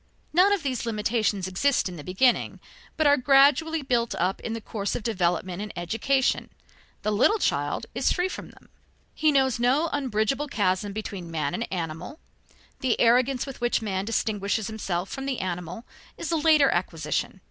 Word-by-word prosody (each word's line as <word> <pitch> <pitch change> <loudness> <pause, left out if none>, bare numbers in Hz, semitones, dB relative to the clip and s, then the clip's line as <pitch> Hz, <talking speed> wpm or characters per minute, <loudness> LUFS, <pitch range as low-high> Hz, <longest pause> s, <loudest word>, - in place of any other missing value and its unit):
None 370 +5 +5
of 405 -4 +1
these 255 -4 -2
limitations 215 -3 0
exist 245 +9 +1
in 180 - -6
the 150 - -9
beginning, 215 - +1 0.4
but 315 - +2
are 285 0 +6
gradually 285 +4 +4
built 240 -3 0
up 185 +2 0
in 225 - -4
the 230 - -3
course 205 -2 -4
of - - -4
development 180 -3 -1
and 210 -1 -5
education. 240 +10 0 0.5
The 215 - 0
little 250 - +3
child 145 - -1
is 250 +3 +1
free 360 +1 +1
from 375 - -7
them. - - -20 0.4
He 310 -1 +2
knows 265 -4 +2
no 270 +7 +2
unbridgable 270 +1 0
chasm 200 -5 0
between 200 -4 -6
man 155 -3 -2
and 230 - -4
animal; 170 - -5 0.6
the 255 -3 0
arrogance 250 +2 +3
with 270 -3 -9
which 240 -1 +1
man 190 -3 -2
distinguishes 210 -1 -1
himself 195 -4 -3
from 270 0 -5
the 265 -2 -1
animal 180 +3 -5 0.3
is - - -4
a - - +2
later 305 -2 +4
acquisition. 170 0 -2
225 Hz, 170 wpm, -26 LUFS, 190-270 Hz, 0.6 s, are